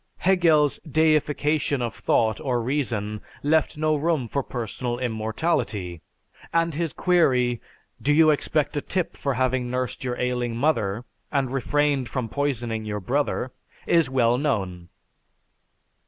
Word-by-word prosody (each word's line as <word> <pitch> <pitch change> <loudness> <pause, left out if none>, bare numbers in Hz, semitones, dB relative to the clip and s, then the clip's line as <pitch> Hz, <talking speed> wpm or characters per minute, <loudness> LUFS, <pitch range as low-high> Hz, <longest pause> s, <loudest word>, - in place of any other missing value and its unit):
Hegel's 165 -6 +3
deification 150 -2 +1
of 120 -2 -2
thought 110 -1 +1
or 125 -3 0
reason 115 -5 -2 0.2
left 155 +1 +2
no 155 0 +2
room 150 -4 0
for 140 +5 -1
personal 120 0 -4
immortality, 110 - -2 0.5
and 165 0 +1
his 165 +1 -1
query, 125 -10 +2 0.4
"Do 145 - +2
you 155 +1 +6
expect 150 0 0
a 145 - 0
tip 180 +1 -2
for 140 -2 -2
having 130 0 0
nursed 125 0 -3
your 125 -1 -2
ailing 125 -2 -1
mother, 115 -6 0 0.3
and 135 -3 0
refrained 140 -1 +1
from 125 -2 -3
poisoning 120 -6 -1
your 105 -1 -3
brother?" 130 +4 -1 0.3
is 165 -6 +3
well 125 -2 +2
known. 95 - -2
130 Hz, 130 wpm, -24 LUFS, 120-150 Hz, 0.5 s, you